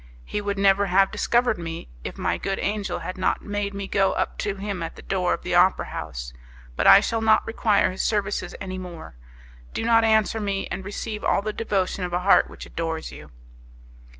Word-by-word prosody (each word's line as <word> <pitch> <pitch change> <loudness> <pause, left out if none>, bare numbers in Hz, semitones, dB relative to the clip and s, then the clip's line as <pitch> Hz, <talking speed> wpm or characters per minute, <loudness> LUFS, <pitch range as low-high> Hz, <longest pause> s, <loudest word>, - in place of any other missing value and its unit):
He 210 - -3
would 200 -1 -2
never 195 0 +4
have 195 +1 +3
discovered 240 -3 +1
me, 165 -1 -6 0.2
if - - -6
my - - -1
good 195 0 -2
angel 205 0 -2
had 185 0 -5
not 185 - 0
made 205 -1 -3
me 200 -1 -4
go 195 -1 +2
up - - -2
to 200 - -1
him 200 -2 -4
at 165 - -5
the - - -12
door - - 0
of - - -14
the - - -3
opera - - +4
house. - - -6 0.4
But - - +1
I 200 - +9
shall 225 +1 -1
not 220 -1 +4
require 220 -3 +2
his 185 - -4
services 210 -1 -1
any 185 -1 -5
more; 170 - -9 0.6
do - - -2
not 230 -1 +5
answer 220 0 +3
me, 200 -2 -2
and 190 - -4
receive 210 +2 -5
all 200 - +2
the 215 0 -3
devotion 195 -4 -1
of 180 -1 -4
a 175 - 0
heart 195 +2 +5
which - - -10
adores 160 -1 -4
you." 75 - -11
200 Hz, 205 wpm, -24 LUFS, 185-210 Hz, 0.6 s, I